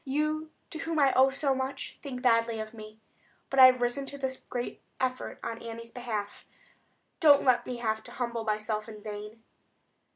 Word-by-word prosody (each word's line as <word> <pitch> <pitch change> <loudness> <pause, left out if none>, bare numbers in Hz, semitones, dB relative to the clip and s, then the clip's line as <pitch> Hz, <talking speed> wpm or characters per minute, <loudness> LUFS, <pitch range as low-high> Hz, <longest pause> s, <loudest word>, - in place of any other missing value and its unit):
You, 305 +3 -1 0.2
to 320 - -6
whom 325 0 -2
I 275 -3 +5
owe 265 +1 +6
so 275 +1 +1
much, 265 +1 -4
think 255 -4 -6
badly 230 -2 +3
of 220 +1 -6
me. 215 -1 -11 0.5
But 270 - +2
I 260 - +12
have 255 -1 +3
risen 245 +3 0
to 280 - -6
this 265 -1 -3
great 245 -1 -5 0.2
effort 255 -1 -2
on 230 - -4
Annie's 230 0 -7
behalf. 220 -5 -4 0.8
Don't 295 -5 +7
let 240 -2 +3
me 250 - -3
have 220 -2 -1
to - - -10
humble 235 -2 -2
myself 215 0 -2
in 210 -1 -10
vain." 210 +1 -7
245 Hz, 185 wpm, -29 LUFS, 225-270 Hz, 0.8 s, I